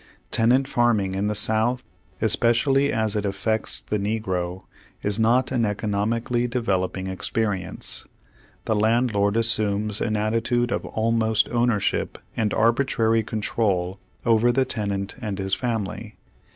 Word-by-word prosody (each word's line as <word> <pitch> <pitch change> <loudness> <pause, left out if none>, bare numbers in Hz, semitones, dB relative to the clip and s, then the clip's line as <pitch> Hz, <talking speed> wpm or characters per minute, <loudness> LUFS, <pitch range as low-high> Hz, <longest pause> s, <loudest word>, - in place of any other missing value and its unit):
Tenant 125 +4 +3
farming 115 -7 +1
in 100 +2 -1
the 105 - -1
South, 110 +4 +2 0.4
especially 135 +4 +3
as 110 -2 +1
it 105 - 0
effects 100 +2 -1
the 105 - -2
negro, 95 -4 -2 0.4
is 105 +1 +1
not 120 +4 +3
an 125 -3 +1
economically 110 +3 -1
develop 100 -7 -1
ing 95 - -4
experience. 95 0 -3 0.6
The 110 - +1
landlord 110 -1 +2
assumes 105 -2 0
an 110 -2 0
atti 110 +2 0
tude 120 0 0
of - - -2
almost 110 -1 +1
ownership 120 -4 0 0.2
and 105 -2 0
arbitrary 115 -1 +2
control 100 -4 -1 0.3
over 115 +1 +4
the 130 +2 +2
tenant 100 -4 -3
and 105 -4 -3
his 95 -1 -1
family. 110 -1 -3
110 Hz, 130 wpm, -24 LUFS, 100-115 Hz, 0.6 s, over